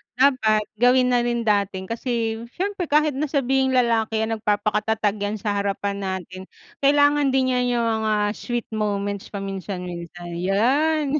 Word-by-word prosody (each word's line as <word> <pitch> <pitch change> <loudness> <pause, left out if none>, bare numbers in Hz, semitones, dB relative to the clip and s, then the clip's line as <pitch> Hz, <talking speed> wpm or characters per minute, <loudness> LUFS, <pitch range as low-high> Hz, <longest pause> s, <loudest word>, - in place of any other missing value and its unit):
dapat 250 -5 +3
gawin 250 +2 +4
na 245 - +3
rin 235 -1 -1
natin. 200 -3 0
Kasi 230 -1 -2
siyempre 390 0 -2
kahit 300 +1 +3
na 305 +2 0
sabihing 270 -2 +1
lalaki 225 -3 +2
yan, 220 0 -1
nagpapaka-tatag 210 0 0
yan 205 +1 -2
sa 205 -1 -1
harapan 200 0 -2
natin, 185 -1 -5 0.4
kailangan 285 0 +3
din 260 -1 +2
niya 250 - +1
yung 235 -1 +1 0.2
mga 215 - +2 0.2
sweet 240 -1 -4
moments 205 -2 -2
paminsan-minsan, 180 -3 -6
yan. 265 - +2
220 Hz, 140 wpm, -23 LUFS, 200-260 Hz, 0.4 s, gawin